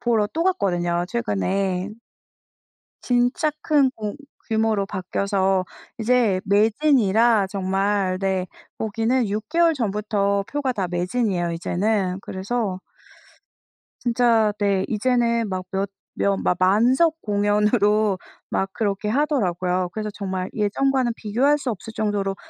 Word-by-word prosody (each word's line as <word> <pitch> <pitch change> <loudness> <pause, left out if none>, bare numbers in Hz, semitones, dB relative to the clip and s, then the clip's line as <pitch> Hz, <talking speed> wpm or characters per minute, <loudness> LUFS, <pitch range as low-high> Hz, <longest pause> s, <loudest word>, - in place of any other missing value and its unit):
보러 225 -3 +2
또 330 - 0
갔거든요, 175 - 0
최근에. 180 - -1 1.1
진짜 250 +6 +1
큰 285 -4 +3
공 210 +1 -4 0.3
규모로 220 -3 +1
바뀌어서 190 0 0 0.3
이제 225 -5 +2
매진이라 220 -1 +3
정말 195 0 0
네. 190 -1 -1 0.3
거기는 225 +2 0
6 215 +1 -3
개월 335 0 +3
전부터 205 -4 0
표가 280 -3 -1
다 190 -5 -2
매진이에요, 180 0 -1
이제는. 185 +2 -1
그래서 190 -1 -3 1.2
진짜 230 -3 +3
네. 200 -2 +1
이제는 235 0 +1
막 185 -1 -3
몇 195 +1 -1 0.3
며 200 0 +1
마 - - +3
만석 250 - +3
공연으로 210 0 +2 0.3
막 195 - -1
그렇게 205 -1 -2
하더라고요. 185 - 0
그래서 215 -1 -3
정말 190 -2 -4
예전과는 245 +4 +1
비교할 255 +8 +1
수 260 - -3
없을 225 +2 -8
정도로 200 -2 -1
210 Hz, 255 characters per minute, -23 LUFS, 190-235 Hz, 1.2 s, 큰